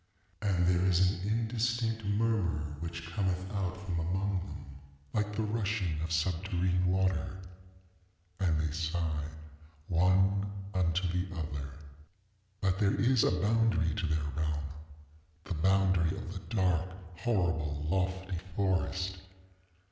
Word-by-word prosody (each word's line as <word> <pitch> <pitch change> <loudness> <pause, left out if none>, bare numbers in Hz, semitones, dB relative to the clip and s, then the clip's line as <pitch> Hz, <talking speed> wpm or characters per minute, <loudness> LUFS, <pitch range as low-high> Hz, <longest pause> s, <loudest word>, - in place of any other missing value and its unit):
And 90 -4 +2
there 90 0 +3
is 90 +1 +4
an 95 +1 -4
indistinct 115 0 0
murmur 100 -8 0
which 85 0 -5
cometh 95 0 0
out 95 -3 -1
from 90 -3 -1
among 95 +4 0
them - - -8 0.5
like 105 -1 0
the 110 - 0
rushing 105 -7 -1
of 80 - -2
subterrene 90 +2 +1
water. 95 -1 +1 1.0
And 85 -5 +2
they 80 -1 0
sigh 80 -1 -1 0.6
one 95 +3 +3 0.2
unto 90 0 +1
the 90 +2 -1
other. 75 -3 -4 0.9
ŌĆ£But 95 0 +2
there 100 -2 +2
is 125 -2 +4
a - - +5
boundary 105 -6 +3
to 85 - -1
their 80 -1 0 1.2
realmŌĆöthe 80 -5 -3
boundary 95 -1 +3
of 100 -3 -6
the 100 +3 -7
dark, 90 -2 +2 0.3
horrible, 80 -9 0
lofty 95 0 -1 0.2
forest. 95 -1 0
95 Hz, 120 wpm, -32 LUFS, 85-100 Hz, 1.2 s, a